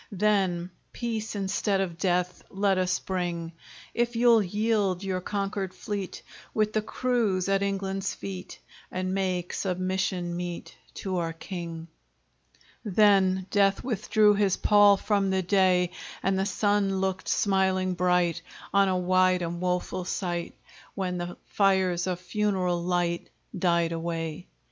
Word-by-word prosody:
Then, 190 -3 +1 0.2
peace 225 -3 -3
instead 200 0 0
of 185 -3 -2
death 180 -1 0
Let 195 -1 +1
us 185 0 +1
bring! 175 -3 -3 0.4
If 240 0 0
you'll 235 -1 +5
yield 205 -1 0
your 185 -1 -2
conquered 195 -1 -3
fleet, 200 -3 -5 0.3
With 215 -1 +1
the 215 - +2
crews, 215 -5 0
at 195 0 +2
England's 195 0 -2
feet, 185 -2 -7 0.3
And 185 0 -2
make 185 -2 -1
submission 185 -1 -1
meet 175 -1 -5 0.2
To 190 -2 -3
our 165 -1 -1
king! 165 -1 -7 1.0
Then 195 -3 +3
death 200 -1 +3
withdrew 215 -3 +3
his 200 -2 +2
pall 205 -1 +6
From 200 -1 +1
the 190 0 +1
day; 185 -1 +3 0.3
And 190 0 +1
the 195 - 0
sun 205 -1 +1
looked 190 -1 -2
smiling 190 -2 +2
bright 180 -2 +1 0.3
On 200 0 +5
a 185 - +1
wide 185 0 +3
and 170 +1 -4
woful 180 0 -1
sight, 175 -2 -3 0.4
Where 190 -2 -2
the 175 0 -4
fires 190 -3 +2
of 180 -1 -2
funeral 180 -2 0
light 175 -1 -1 0.3
Died 170 -2 +2
away. 165 0 -4
190 Hz, 135 wpm, -27 LUFS, 180-200 Hz, 1.0 s, pall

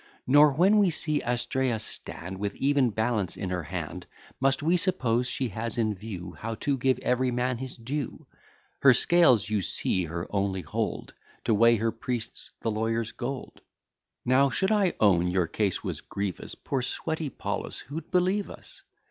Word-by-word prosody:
Nor, 145 +2 +6
when 190 +8 +4
we 200 -3 +4
see 155 -2 +1
Astraea 125 0 0
stand 95 -3 -6
With 100 0 -3
even 140 -2 +2
balance 110 -4 -1
in 95 -2 -4
her 90 -1 -1
hand, 80 0 -6 0.3
Must 135 +1 +2
we 165 +3 +3
suppose 130 -10 +1
she 130 -1 -1
has 110 +3 -4
in 110 -2 +1
view, 95 -3 -7
How 115 +5 -5
to 140 +4 -1
give 130 0 +1
every 125 +1 +1
man 125 0 -1
his 130 -1 -6
due; 130 +3 -5 0.5
Her 135 -3 +7
scales 130 - +4
you 105 -2 +1
see 90 0 +1
her 85 +1 -4
only 100 -2 0
hold, 75 -3 -3 0.3
To - - +2
weigh 115 +2 +5
her 115 +1 0
priests' 120 -1 -5
the 115 - 0
lawyers' 110 +1 -1
gold. 130 +2 -6 0.6
Now, 135 +2 +4
should 190 +8 +1
I 205 -4 +2
own 90 -5 +4
your 90 0 +1
case 95 +3 -1
was - - -4
grievous, 100 -2 -5
Poor 135 -2 -3
sweaty 160 +4 -3
Paulus, - - -4
who'd 155 +5 -7
believe 185 +3 +1
us? - - -12
120 Hz, 170 wpm, -27 LUFS, 105-140 Hz, 0.6 s, Her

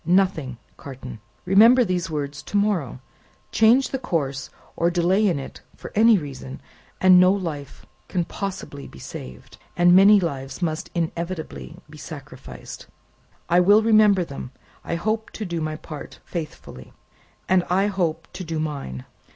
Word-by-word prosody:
"Nothing, 170 -7 +1 0.2
Carton." 130 -4 -9 0.3
"Remember 225 +7 +6
these 180 -3 -2
words 145 -2 -4
to 205 - -3
morrow: 185 - 0 0.5
change 235 +4 +4
the 265 - -3
course, 140 - -2 0.3
or 170 - +2
delay 180 +4 +2
in 175 - +1
it 135 - -8
for - - -10
any 225 +1 +6
reason 135 -4 -7 0.4
and 185 -1 +7
no 185 +1 +6
life 160 -8 -5 0.2
can 175 -3 -1
possibly 190 -9 -6
be - - -14
saved, 65 -1 -10 0.2
and 175 0 +6
many 200 +2 +7
lives 135 -6 -4
must 160 -3 -2
inevitably 165 - -4
be - - -13
sacrificed." - - -10 0.6
"I 175 +1 +4
will 205 +4 +5
remember 215 -4 +5
them. 140 -4 -8 0.3
I - - -3
hope 215 +5 -2
to 215 - -5
do 170 -3 -3
my 155 0 -2
part 155 -1 -9
faithfully." 150 - -8 0.5
"And 185 -1 +3
I 190 +3 +2
hope 170 -5 -1
to 185 - -6
do 165 -2 -4
mine. 140 - -5
175 Hz, 150 wpm, -23 LUFS, 145-195 Hz, 0.6 s, and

